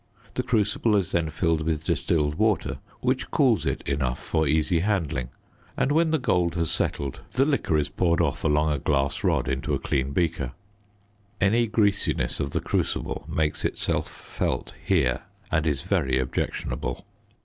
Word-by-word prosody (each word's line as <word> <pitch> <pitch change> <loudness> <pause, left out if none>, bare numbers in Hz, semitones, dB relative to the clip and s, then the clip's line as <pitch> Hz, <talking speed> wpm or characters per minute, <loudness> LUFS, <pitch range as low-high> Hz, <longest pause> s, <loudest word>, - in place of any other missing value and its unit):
The - - 0
crucible 105 -1 +1
is 95 -5 +1
then 85 -2 +1
filled 80 +1 +1
with 80 -1 -1
distilled 75 -3 +1
water, 110 +4 +1 0.2
which - - 0
cools - - +3
it - - -1
enough 65 -3 0
for 80 -1 0
easy 80 +3 +2
handling; 80 - 0 0.5
and 140 - +2
when 160 +2 +3
the 160 - +3
gold 90 - +1
has 85 -2 0
settled 70 -2 -2
the 135 +2 +3
liquor 140 - +1
is 75 -2 +1
poured 85 +2 +1
off 75 -4 0
along 75 0 +2
a 75 - 0
glass 70 0 0
rod - - +2
into 70 +3 -1
a - - -2
clean 65 0 0
beaker. 75 -5 -1 0.9
Any 115 +5 +3
greasiness 105 -2 +1
of 70 - -1
the - - -2
crucible - - -1
makes 75 -1 0
itself - - -1
felt - - -3
here - - +2 0.3
and 80 0 +1
is 75 -1 0
very 85 -9 +1
objectionable. 65 -1 -2
80 Hz, 160 wpm, -26 LUFS, 70-95 Hz, 0.9 s, cools